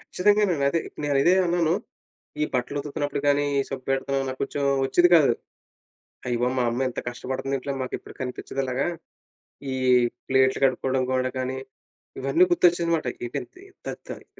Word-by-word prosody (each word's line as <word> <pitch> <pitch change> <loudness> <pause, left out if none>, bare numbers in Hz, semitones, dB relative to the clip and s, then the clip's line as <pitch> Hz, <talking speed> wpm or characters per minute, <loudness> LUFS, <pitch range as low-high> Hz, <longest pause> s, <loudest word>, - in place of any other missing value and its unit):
ఖచ్చితంగానండి 200 -6 +2
అదే. 165 - +1 0.2
నేను 145 -1 +1
ఇదే 180 +4 +5
అన్నాను. 170 -1 +2 0.7
ఈ - - +4
బట్టలు 125 +3 -1
ఉతుకుతున్నప్పుడు 145 -1 -3
కానీ, 145 0 +3 0.2
సబ్బెడతం 135 +1 -2
నాకు 130 0 -6
కొంచెం 140 +1 -2 0.2
వచ్చేది 175 +6 +4
కాదు. 140 -6 +5 0.9
అయ్య 120 -1 0
బాబోయ్! 125 +1 +1
మా 125 - +2
అమ్మ 130 +2 0
ఎంత 125 - -4
కష్టపడుతుంది. 130 +2 -3
ఇంట్లో 140 +2 -4
మాకు 130 - -5
ఎప్పుడు - - -13
కనిపించదు 130 +1 -4
అలాగా. 130 +3 -1 0.9
ఈ - - -2 0.5
ప్లేట్లు 130 0 +3
కడుక్కోవడం 130 0 0
కూడా 130 0 0
కానీ, 130 +1 -2 0.6
ఇవన్నీ 135 +7 +4
గుర్తొచ్చింది 175 -1 +3
అన్నమాట. 165 -6 +1 0.2
ఇదేంటి 370 - -7 0.2
త - - -3 0.2
తయి - - -7
135 Hz, 150 wpm, -25 LUFS, 130-165 Hz, 0.9 s, ఇదే